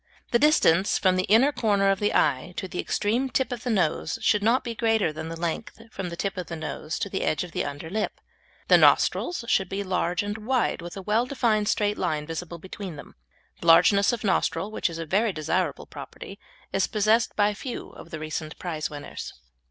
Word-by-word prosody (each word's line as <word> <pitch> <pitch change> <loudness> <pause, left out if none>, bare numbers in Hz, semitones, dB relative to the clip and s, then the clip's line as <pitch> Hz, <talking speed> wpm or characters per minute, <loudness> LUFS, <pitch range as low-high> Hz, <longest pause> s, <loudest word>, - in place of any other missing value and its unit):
The 235 - +4
distance 200 - +4
from 185 -1 +3
the 185 0 +1
inner 230 +8 +5
corner 200 -6 +2
of 195 - 0
the 205 - +1
eye 130 +7 +1
to 190 - -3
the 180 - -6
extreme 235 +6 0
tip 255 +1 0
of 240 -2 -4
the 250 - -2
nose 175 -7 0
should 210 - +3
not 230 +5 +3
be 235 - -4
greater 225 -7 +1
than 160 +1 -6
the 165 0 -6
length 170 +7 -4
from 190 -2 -5
the 170 - -6
tip 195 +2 -3
of 180 - -4
the 170 - -5
nose 155 0 -5
to 215 - -2
the 195 -1 -3
edge 150 - 0
of 180 - -9
the - - -1
under 145 +3 -6
lip. 210 +5 -3 0.5
The - - +7
nostrils 345 -9 +3
should 190 -4 +2
be 200 +1 -2
large 180 -1 0
and 205 +2 -4
wide, 240 -3 0
with 175 +2 -8
a 195 - -6
well 220 +5 +1
defined 225 -6 +1
straight 210 -1 +1
line 150 -1 -1
visible 165 +2 -6
between 185 0 -8
them. 145 - -11 0.5
The - - -6
largeness 180 +6 +6
of 240 - -4
nostril, 205 +1 0
which 215 - -1
is 165 - -6
a 165 - -4
very 205 +7 +1
desirable 165 +4 -1
property, - - -10 0.3
is - - +2
possessed 215 +1 +2
by 210 0 +3
few 240 +4 -6
of 165 - -13
the 155 - -5
recent 155 0 -5
prize 160 -4 -3
winners. 145 -1 -7
195 Hz, 215 wpm, -26 LUFS, 170-220 Hz, 0.5 s, The